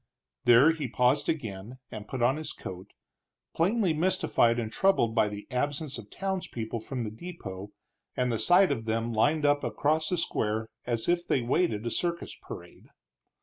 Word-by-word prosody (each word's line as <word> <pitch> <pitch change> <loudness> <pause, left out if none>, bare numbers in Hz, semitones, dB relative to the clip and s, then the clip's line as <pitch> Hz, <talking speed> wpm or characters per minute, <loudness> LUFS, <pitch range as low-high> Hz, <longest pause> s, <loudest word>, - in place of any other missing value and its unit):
There 120 +6 +7
he 155 -4 -3
paused 125 +3 +2
again, 115 -5 -4
and 105 -1 -7
put 130 0 -3
on 130 +4 +3
his 155 - -4
coat, 95 +2 -9 0.6
plainly 190 +1 +2
mystified 160 -8 +2
and 110 -2 -2
troubled 190 -12 +2
by 110 -2 +3
the 105 0 -7
absence 145 +1 -2
of 105 -3 -12
townspeople 180 - -3
from 125 +2 -4
the 105 - -4
depot, 105 - -8 0.5
and 125 -1 +1
the 115 - -1
sight 180 0 +5
of 115 -5 -2
them 115 +1 -1
lined 145 +7 +2
up 145 0 +3
across 155 +2 0
the 180 - 0
square 110 -8 -1 0.2
as 115 -2 -1
if 175 0 +1
they 130 - +1
waited 120 - 0
a 120 - -1
circus 170 +4 -1
parade. 85 0 -11
125 Hz, 170 wpm, -28 LUFS, 110-160 Hz, 0.6 s, There